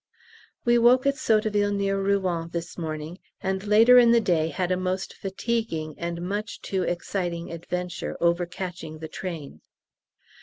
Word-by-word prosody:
We 240 0 +5
woke 250 +3 +5
at 280 - +4
Sotteville 215 -7 +1
near 195 0 0
Rouen 185 -4 0
this 170 0 -5
morning, 160 +1 -5 0.2
and 190 0 -2
later 225 +4 +7
in 240 -1 +6
the 235 0 +6
day 175 -7 +1
had 175 +3 -2
a - - +3
most 185 +1 -2
fatiguing 195 -6 -3
and 170 0 -3
much 205 +4 -3
too 190 -1 -2
exciting 175 -1 -2
adventure 175 +2 -4
over 170 +1 +2
catching 175 -3 -6
the 160 0 -7
train. 160 - -7
185 Hz, 150 wpm, -26 LUFS, 170-210 Hz, 0.2 s, later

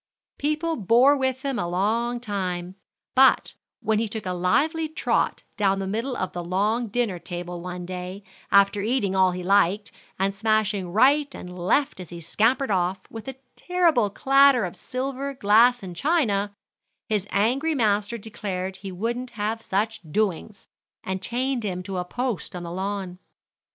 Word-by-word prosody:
People 305 +3 0
bore 240 +7 +5
with 260 -1 -1
him 270 -3 -1
a 175 - -1
long 225 +7 0
time; 185 -5 -3 0.4
but 265 0 +5 0.3
when 220 -1 +1
he 225 -1 -1
took 220 -1 -5
a 185 - -1
lively 310 - +1
trot 315 - 0
down 195 -2 +2
the 195 - -3
middle 230 +6 -2
of 185 -1 -3
the 175 - -4
long 210 +7 0
dinner 210 -4 -1
table 175 0 -6
one 180 0 -6
day, 185 +2 -6 0.3
after 200 0 +5
eating 210 -3 0
all 190 -1 +5
he 180 0 -4
liked, 200 +2 +2 0.3
and 195 +1 0
smashing 210 -3 0
right 275 +7 +3
and 180 0 -8
left 185 +8 +1
as 180 - -8
he 170 - -8
scampered 225 - +1
off, 185 0 0
with 225 0 -8
a 265 - -5 0.2
terrible 335 - +2
clatter 270 +1 +4
of 175 - -6
silver, 270 +2 -4
glass, 235 +2 +4
and 180 -2 -7
china, 210 - +1 0.6
his 210 -3 -1
angry 260 +10 +1
master 210 -2 +1
declared 195 -4 -5
he 195 0 -7
wouldn't 235 +7 -3
have 215 +2 -2
such 215 +2 -1
doings, 205 0 -2 0.4
and 190 0 -3
chained 250 +2 -1
him 180 -3 -3
to 190 0 -5
a 180 - -1
post 240 -4 -3
on 175 - -5
the 170 - -6
lawn. 190 0 -4
210 Hz, 165 wpm, -25 LUFS, 185-245 Hz, 0.6 s, bore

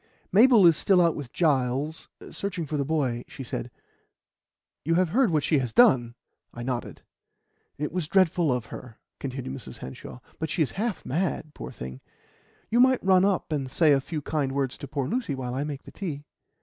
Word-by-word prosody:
"Mabel 225 0 +7
is 165 -2 +7
still 190 -2 +3
out 170 -2 +3
with 135 -5 -7
Giles, 145 -1 0 0.2
searching 195 -4 -4
for 150 - -4
the 140 - +1
boy," 135 -5 -1
she 135 - -8
said. 125 0 -5 1.1
"You 165 +3 +1
have 180 -1 +2
heard 240 +5 +3
what 155 -3 +1
she 150 -1 +2
has 125 -3 -2
done!" 120 -1 +5 0.4
I 120 - -7
nodded. 125 -1 -4 0.7
"It 150 +1 -3
was 175 -2 -2
dreadful 175 -4 +3
of 125 -3 -1
her," 120 -3 -9 0.2
continued 130 -1 -5
Mrs. 130 - -9
Hanshaw, 65 0 -9 0.2
"but 160 - -2
she 165 - +2
is 135 - -3
half 215 +1 -3
mad, 155 -1 -2
poor - - -8
thing. 65 +1 -8 0.7
You 235 - +3
might 260 0 +4
run 190 -1 +5
up 195 -5 0
and 140 -4 -2
say 155 +3 +4
a 140 -1 +4
few 150 +1 -5
kind 140 -4 -1
words 135 -2 -1
to 140 - -7
poor 140 -1 -2
Lucy 230 - -2
while 125 -2 -4
I 135 +2 -1
make 145 -2 -5
the - - -12
tea." 155 -8 -5
150 Hz, 195 wpm, -26 LUFS, 130-175 Hz, 1.1 s, Mabel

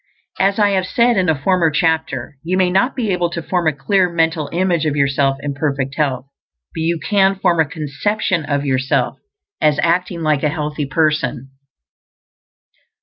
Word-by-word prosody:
As 195 +1 +2
I 205 -2 +3
have 190 -2 0
said 235 +4 +2
in 185 -4 +1
a 155 -3 +1
former 175 +2 +2
chapter, 155 -4 -1
you 180 +3 -1
may 185 -1 +2
not 195 +8 +1
be 225 -6 -1
able 175 -2 0
to 170 0 -5
form 175 -2 -1
a - - +4
clear 180 +6 +1
mental 165 -3 0
image 175 -3 0
of 150 - -1
yourself 140 -1 +1
in 145 -1 -3
perfect 140 -2 -2
health, 140 -4 -1 0.5
but 160 - -4
you 165 +1 0
can 195 0 +2
form 180 -3 +1
a 160 - +4
conception 165 +5 -2
of 145 -1 -2
yourself 130 -1 0 0.4
as 150 -1 +3
acting 175 0 0
like 155 -2 +1
a 150 - +1
healthy 150 -1 -3
person. 150 -4 -1
160 Hz, 175 wpm, -18 LUFS, 145-185 Hz, 0.5 s, a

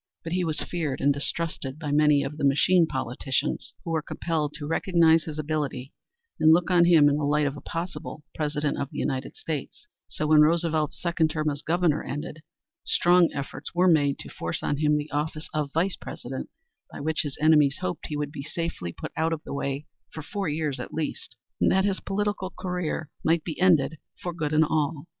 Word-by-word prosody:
But 165 - -4
he 180 0 +1
was 160 -2 -1
feared 155 -6 -2
and 145 - +3
distrusted 140 -1 -3
by 150 -2 -4
many 150 -1 +4
of 145 +2 -5
the 150 - -4
machine 165 +5 +4
politicians, 130 -1 -2
who 165 - -4
were 160 -1 +1
compelled 155 -1 -2
to 150 -1 -5
recognize 165 0 +3
his 155 -1 -6
ability 145 -4 -3 0.5
and 155 - +6
look 175 +3 +4
on 175 -1 +6
him 165 -4 +6
in 145 0 +3
the 150 - -2
light 145 +1 +2
of 140 0 -1
a 145 - -9
possible 165 -2 -5
President 150 -1 -1
of 140 - -2
the - - -9
United 135 - -2
States, 440 -1 -5 0.2
so 155 - -3
when 150 0 +6
Roosevelt's 160 -1 +2
second 170 -2 +1
term 155 -1 0
as 145 0 -5
Governor 165 -1 +1
ended, 145 +2 -6 0.4
strong 175 -1 +4
efforts 140 +2 -6
were 180 +1 +4
made 145 -5 +4
to - - -9
force 85 0 -4
on 145 - 0
him 150 0 +3
the 150 +1 -4
office 155 +1 -2
of 150 -2 -1
Vice 175 +5 0
President, 130 +2 -7 0.4
by - - -8
which 155 +2 0
his 145 -4 -5
enemies 150 -3 +5
hoped 90 - -3
he 150 - -3
would 145 -1 -3
be 145 -2 -6
safely 160 - -4
put - - -7
out 160 +1 +1
of 155 - -5
the - - -7
way 140 +1 -3 0.3
for 160 - -7
four 195 +3 -3
years 150 -2 -2
at - - -6
least, 160 - -4 0.2
and - - +4
that 190 +1 +3
his 195 -2 0
political 205 -1 -2
career 180 -4 -3
might 165 0 +2
be 165 0 -5
ended 160 -5 +4 0.2
for 175 - -4
good 155 -3 -2
and 155 +1 +4
all. 150 -1 -1
155 Hz, 205 wpm, -26 LUFS, 145-165 Hz, 0.5 s, and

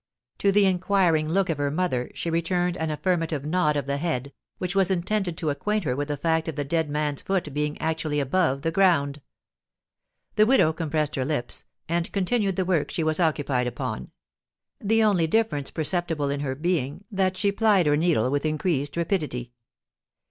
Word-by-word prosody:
To 200 - +3
the 200 0 +4
inquiring 180 -4 +2
look 190 +3 +2
of 150 - -4
her 145 0 +1
mother, 145 -6 -1
she 170 - -3
returned 175 +1 0
an 160 -3 -2
affirmative 160 -2 -1
nod 155 -1 +1
of 145 -3 -1
the 140 0 -1
head, 140 -4 -2 0.2
which 180 +1 -3
was 195 -1 +3
intended 190 -1 -1
to 155 -4 -1
acquaint 210 +8 -1
her 125 -5 -1
with 145 +1 -2
the 145 -1 -2
fact 160 +2 0
of 160 - -3
the 145 - -1
dead 160 +1 0
man's 150 -1 -1
foot 185 -7 -2
being 150 +1 -2
actually 160 -2 -1
above 140 -1 +1
the 165 - 0
ground. 160 -6 +2 1.2
The 215 0 +6
widow 230 -11 +4
compressed 155 -2 -1
her 130 - +1
lips, 130 -4 -2 0.2
and 170 +1 -1
continued 200 0 0
the 185 - 0
work 175 -5 +1
she 165 - -2
was 155 +1 0
occupied 145 -6 +1
upon; 120 - -4 0.7
the 225 +2 +2
only 190 -6 +3
difference 160 -8 +1
perceptible 160 -3 -1
in 140 - -2
her 135 -2 -2
being 155 +2 -2
that 190 -2 0
she 200 +1 +2
plied 205 -4 +3
her 145 0 +4
needle 150 -7 +2
with 145 0 0
increased 155 -2 -1
rapidity. 150 -9 -2
160 Hz, 185 wpm, -25 LUFS, 145-185 Hz, 1.2 s, The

